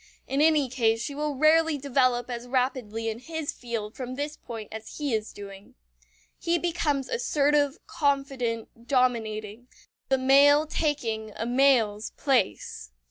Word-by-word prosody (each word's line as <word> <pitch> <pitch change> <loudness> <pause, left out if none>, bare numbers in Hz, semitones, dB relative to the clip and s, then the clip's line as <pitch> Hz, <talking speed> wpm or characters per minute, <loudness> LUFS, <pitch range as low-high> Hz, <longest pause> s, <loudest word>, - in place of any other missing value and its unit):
In 275 +2 0
any 305 -3 +4
case 230 -3 +1
she 285 - -4
will 295 0 -2
rarely 315 +2 +4
develop 255 -3 +1
as 240 -1 -6
rapidly 245 -3 -1
in 225 0 -3
his 320 +3 -4
field 225 -3 -5
from 255 -1 -5
this 295 +2 -3
point 225 -7 -8
as 220 0 -8
he 290 -4 -2
is 215 0 -2
doing. 200 -1 -11 0.6
He 340 0 +1
becomes 315 -6 -1
assertive, 290 - +1
confident, 260 -5 -2
dominating; 230 -3 0 0.4
the 265 - +3
male 280 +3 +5
taking 230 -9 -2
a 225 - -3
male's 240 -4 +3
place. 245 - 0
255 Hz, 135 wpm, -27 LUFS, 225-290 Hz, 0.6 s, male